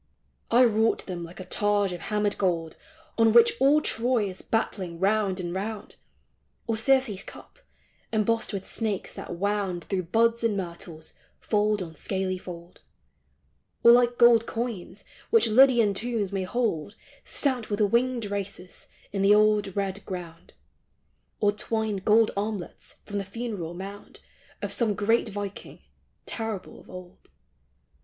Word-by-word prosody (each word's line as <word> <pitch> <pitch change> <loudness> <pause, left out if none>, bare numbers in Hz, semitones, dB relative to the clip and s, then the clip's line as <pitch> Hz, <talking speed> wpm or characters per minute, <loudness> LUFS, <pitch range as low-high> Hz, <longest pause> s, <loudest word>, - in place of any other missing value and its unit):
I 240 +2 +6
wrought 225 -1 +2
them 175 -2 -5
like 170 +2 -10
a 185 - -7
targe 205 0 +1
of 175 - -7
hammered 210 -1 0
gold 170 -4 0 0.4
On 225 -1 +5
which 235 0 +7
all 285 +3 +4
Ti^ 235 -2 +1
is 185 -1 -7
battling 185 -6 -2
round 200 -1 +1
and 175 -1 -4
round; 205 +2 -5 0.7
Or 225 - -1
Circe's 225 -3 +2
cup, - - -13 0.5
embossed 225 +1 +1
with 195 -2 -5
snakes 215 -4 -2
that 175 - -7
wound 195 -2 -1
Through 185 -3 -2
buds 230 +2 +2
and 220 -3 +1
myrtles, 170 -3 -7 0.3
fold 210 -2 +1
on 165 -2 -9
scaly 185 +2 -3
fold; 175 -1 -10 1.0
Or 235 - +9
like 240 0 +4
gold 235 -1 +6
coins, 225 -5 -5 0.3
which 455 - +5
Lydian 235 -2 +5
tombs 215 -1 -1
may 195 -2 -2
hold 205 -5 -2 0.3
Stamped 255 -6 -1
with 205 0 -2
winged 235 +3 +1
racers, 200 -2 -5 0.2
in 195 - -2
the 200 +1 +6
old 210 -2 +3
red 195 0 -2
ground; 175 -3 -8 0.8
Or 205 -1 +3
twined 215 -1 -2
gold 220 +1 +5
armlets 200 -2 -5
from 205 -1 -3
the - - -3
funeral 195 -5 -5
mound 195 +2 -9 0.4
Of - - -2
some 220 -4 +1
great 225 +3 +1
viking, 205 -1 -6 0.5
terrible 220 -4 -5
of - - -18
old. 180 0 -12
205 Hz, 145 wpm, -26 LUFS, 190-225 Hz, 1.0 s, Or